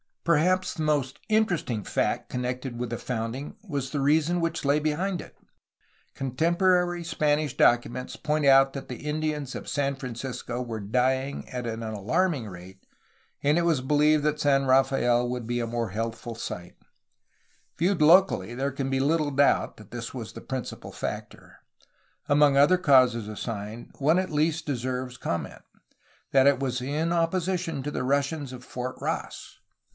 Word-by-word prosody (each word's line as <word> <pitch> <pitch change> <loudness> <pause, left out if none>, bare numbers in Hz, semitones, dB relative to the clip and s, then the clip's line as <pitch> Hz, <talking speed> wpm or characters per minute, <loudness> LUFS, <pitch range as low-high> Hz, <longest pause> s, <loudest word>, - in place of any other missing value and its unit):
Perhaps 180 +4 +2
the 160 - -3
most 145 -4 0
interesting 175 - +1
fact - - -1
connected 125 0 -3
with 120 -1 -3
the 120 - -2
founding 125 - -4
was 140 -6 -3
the 145 - -2
reason 155 +5 +2
which 165 0 -2
lay 140 +2 +3
behind 170 +5 -1
it. - - -14 0.8
Con 135 -1 -3
temporary 175 +2 +2
Spanish 150 -2 0
documents 120 +1 +2
point 150 0 -1
out 135 0 +6
that 135 - -6
the 125 - -6
Indians 150 -2 -2
of - - -7
San 140 -1 0
Francisco 125 -1 -5
were 115 -3 -4
dying 130 +6 0
at 125 -2 -4
an 115 0 -4
alarming 120 - 0
rate, 95 0 -12 0.6
and 145 +3 +3
it - - +3
was 165 -6 +2
beheved 150 +3 +3
that 150 0 0
San 140 -2 +3
Rafael 130 -2 +3
wc^ld 125 -1 -4
be 120 0 -1
a 115 - -2
more 115 -1 -2
healthful 115 +3 -4
site. 90 -5 -7 1.0
Viewed 180 +1 +1
locally 155 - +5
there 135 +2 -1
can 135 0 -3
be 135 - +1
little 150 +1 +1
doubt 140 +1 +2
that - - -15
this - - -6
was - - -7
the - - -9
principal - - -6
factor. - - -7 0.7
Among 145 -1 +4
other 145 +7 +6
causes 130 - +4
assigned, 110 +1 -6
one 155 +5 +3
at 185 -1 -1
least 155 +1 0
deserves 125 -2 -3
comment: 85 -8 -4 0.7
that 135 0 +5
it 140 -2 +4
was 130 -2 -1
in 150 +6 -1
opposition 170 -2 0
to 150 - -3
the 125 - -2
Russians 140 +1 0
of 125 -1 -9
Fort 125 +1 -5
Ross. - - -5
135 Hz, 160 wpm, -27 LUFS, 125-155 Hz, 1.0 s, out